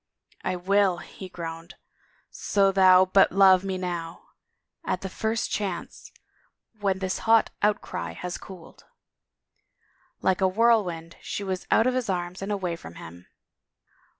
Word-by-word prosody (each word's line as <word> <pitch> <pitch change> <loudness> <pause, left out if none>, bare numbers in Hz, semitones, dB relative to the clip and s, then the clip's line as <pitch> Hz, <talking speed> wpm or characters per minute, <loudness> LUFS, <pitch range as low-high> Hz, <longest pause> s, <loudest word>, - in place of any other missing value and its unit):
" - - -31
I 185 - -1
will," 190 0 +2
he 185 +2 -10
groaned, 165 -1 -8 0.4
" - - -39 0.2
so 195 -1 +4
thou 185 -1 +6
but 190 +1 +4
love 190 -1 +6
me 190 -1 -3
now. 175 -2 -5 0.5
At - - -2
the 190 - -5
first 220 +4 -2
chance... 195 -5 -4 0.7
when 195 -2 0
this 190 -1 -3
hot 225 -1 +5
outcry 85 - -1
has 180 - -6
cooled." 185 -4 -13 1.3
Like 190 0 +1
a 190 - +4
whirlwind 185 -6 +1
she 205 - -5
was 190 -2 -4
out 225 - +4
of 255 - +2
his 250 -4 -2
arms 180 0 -3
and 195 +2 -4
away 185 -4 -2
from 85 - -12
him. 85 +2 -12
185 Hz, 150 wpm, -26 LUFS, 175-200 Hz, 1.3 s, thou